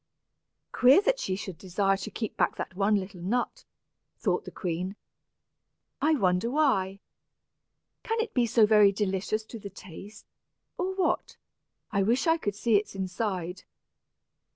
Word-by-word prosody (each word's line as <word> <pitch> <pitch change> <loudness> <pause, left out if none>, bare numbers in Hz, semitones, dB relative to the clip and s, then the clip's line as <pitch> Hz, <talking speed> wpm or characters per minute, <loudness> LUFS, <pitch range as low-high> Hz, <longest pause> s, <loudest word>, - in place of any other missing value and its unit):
"Queer, 255 +7 +6
that - - +1
she 185 - -1
should 190 -4 -7
desire 195 +1 +1
to 195 +2 -6
keep 215 +1 -5
back - - +1
that - - -5
one 200 +2 +2
little 190 -2 -4
nut," 235 +7 -2 0.5
thought - - 0
the - - -6
queen. 180 +2 -3 1.1
"I 310 +1 +4
wonder 185 -2 +1
why? 215 -9 +1 1.0
Can 450 +1 -2
it 450 -1 -2
be 245 -2 +2
so 225 -1 +5
very 210 -2 +6
delicious 200 +2 -1
to 225 +1 -9
the 200 - -7
taste, 195 +2 -12 0.5
or 375 +1 -1
what? 375 -2 -1 0.5
I 200 - +1
wish 235 - +2
I 325 0 +4
could 205 -9 -2
see 220 0 +3
its 205 -1 -3
inside." 185 -2 -3
205 Hz, 150 wpm, -28 LUFS, 190-240 Hz, 1.1 s, Queer